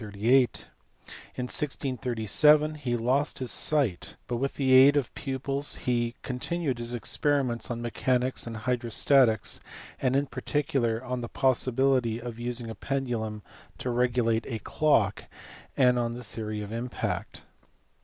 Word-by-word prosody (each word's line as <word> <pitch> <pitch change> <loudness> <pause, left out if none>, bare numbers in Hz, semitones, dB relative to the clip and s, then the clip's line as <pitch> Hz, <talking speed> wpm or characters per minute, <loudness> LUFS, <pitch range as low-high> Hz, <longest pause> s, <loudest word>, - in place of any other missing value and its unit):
In 110 - -7 1.3
1637 135 +2 +2
he 130 -6 -2
lost 130 +6 0
his 130 -3 -2
sight, 135 - +1
but 120 - -2
with 135 +3 -2
the 130 -2 +2
aid 135 +3 +8
of 135 -5 -1
pupils 140 +1 -2
he 120 -1 -1
con 125 -1 -4
tinued 155 -6 -2
his 120 +1 -2
experiments 125 -2 -1
on 120 -1 -4
mechanics 125 +1 0
and 115 -1 -5
hydrostatics, 120 0 +2 0.4
and 130 -1 +1
in 140 +1 +2
particular 130 -5 -1
on 125 -1 -3
the 120 - -6
possibility 130 -2 +2
of 120 -1 -7
using 120 0 -3
a 115 - -5
pendulum 110 -4 -3 0.3
to 125 - -3
regulate 120 -2 +1
a 115 - -3
clock, 110 -3 +1 0.5
and 125 -2 +4
on 120 0 -1
the 125 - -8
theory 110 -1 -5
of 105 - -8
impact. 115 +2 -4
125 Hz, 135 wpm, -27 LUFS, 115-135 Hz, 1.3 s, aid